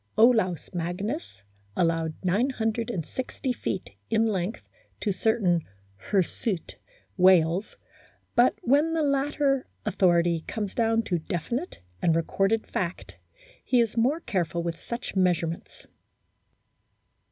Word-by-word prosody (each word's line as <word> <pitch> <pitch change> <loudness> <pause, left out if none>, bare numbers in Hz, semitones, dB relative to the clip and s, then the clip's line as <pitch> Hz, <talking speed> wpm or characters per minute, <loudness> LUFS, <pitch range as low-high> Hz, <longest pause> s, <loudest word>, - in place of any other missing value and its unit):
Olaus 215 - +3
Magnus 180 - -4 0.3
allowed 165 -2 +1
960 230 - -1
feet 190 -5 -4 0.2
in 220 +1 +3
length 200 -1 -2 0.3
to 210 - 0
certain 190 -4 +2 0.5
"hirsute" 190 0 -1 0.4
whales, 185 0 +4 0.6
but 245 +1 +4
when 290 +6 +3
the 320 - +1
latter 280 -1 +1 0.2
authority 175 -4 +2
comes 210 -3 -3
down 225 -1 +2
to 175 -5 -1
definite 200 - -4 0.2
and 165 - +3
recorded 195 +6 +1
fact, 180 -1 -4 0.5
he 250 - +3
is 230 -2 +1
more 255 +8 +2
careful 175 - -1
with 170 -1 -3
such 235 -2 -5
measure 180 -3 +3
ments. 165 +1 -7
205 Hz, 105 wpm, -27 LUFS, 175-240 Hz, 0.6 s, whales